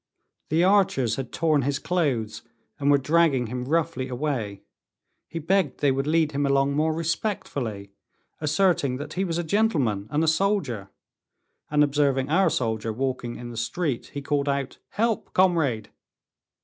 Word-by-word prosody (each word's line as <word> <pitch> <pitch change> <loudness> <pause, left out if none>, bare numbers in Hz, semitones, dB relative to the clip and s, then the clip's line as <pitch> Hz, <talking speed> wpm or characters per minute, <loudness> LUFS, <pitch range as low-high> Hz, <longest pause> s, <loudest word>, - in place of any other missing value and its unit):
The 160 +3 +3
archers 190 - +3
had 135 -3 -5
torn 155 -3 +2
his 140 +2 0
clothes, 140 -13 -1 0.4
and 140 0 +1
were 145 - +6
dragging 145 -2 +2
him 125 +2 -4
roughly 160 -2 0
away. 125 -7 -3 0.6
He - - -7
begged 165 -1 0
they 145 -2 +3
would 135 +2 -1
lead 160 -1 +2
him 145 0 -1
along 140 0 +2
more 155 +2 +2
respectfully, 155 - -3 0.5
asserting 155 -4 +1
that 145 - -7
he 190 - -1
was 170 -3 -2
a 175 - -1
gentleman 150 - +1
and 150 +2 +1
a - - +1
soldier. 160 - 0 0.8
And 150 0 +4
observing 140 -1 +1
our 190 +4 +4
soldier 110 -2 -1
walking 125 0 -3
in 120 0 -8
the 115 - -8
street, 130 +3 -2
he 140 - -4
called 145 -1 0
out, 140 -1 -2
"Help, 225 +1 -1
comrade." 160 - +2
145 Hz, 155 wpm, -25 LUFS, 125-165 Hz, 0.8 s, were